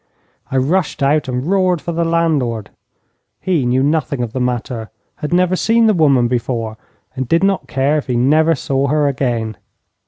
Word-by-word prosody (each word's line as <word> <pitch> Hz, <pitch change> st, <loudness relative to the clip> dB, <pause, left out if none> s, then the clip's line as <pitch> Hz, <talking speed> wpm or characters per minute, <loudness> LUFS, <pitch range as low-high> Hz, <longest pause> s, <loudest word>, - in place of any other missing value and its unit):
I 135 Hz, -, -1 dB
rushed 150 Hz, +3 st, 0 dB
out 145 Hz, +2 st, +2 dB
and 125 Hz, +1 st, -3 dB
roared 185 Hz, -1 st, +2 dB
for 170 Hz, -, -5 dB
the 170 Hz, 0 st, -1 dB
landlord. 155 Hz, -10 st, 0 dB, 0.7 s
He 165 Hz, -9 st, 0 dB
knew 130 Hz, +2 st, +2 dB
nothing 145 Hz, -3 st, 0 dB
of 115 Hz, -1 st, -5 dB
the 130 Hz, -, -2 dB
matter, 120 Hz, -2 st, -3 dB, 0.3 s
had 150 Hz, -, -5 dB
never 180 Hz, +1 st, +2 dB
seen 225 Hz, +4 st, +2 dB
the 220 Hz, -, +4 dB
woman 140 Hz, -8 st, +3 dB
before, 115 Hz, -2 st, -2 dB, 0.4 s
and 130 Hz, -1 st, -3 dB
did 165 Hz, +7 st, +2 dB
not 195 Hz, -1 st, +1 dB
care 140 Hz, +3 st, +1 dB
if -, -, -9 dB
he 125 Hz, -, -1 dB
never 155 Hz, +7 st, +3 dB
saw 135 Hz, 0 st, -1 dB
her 150 Hz, +1 st, +2 dB
again. 120 Hz, -6 st, -2 dB
140 Hz, 180 wpm, -17 LUFS, 125-165 Hz, 0.7 s, the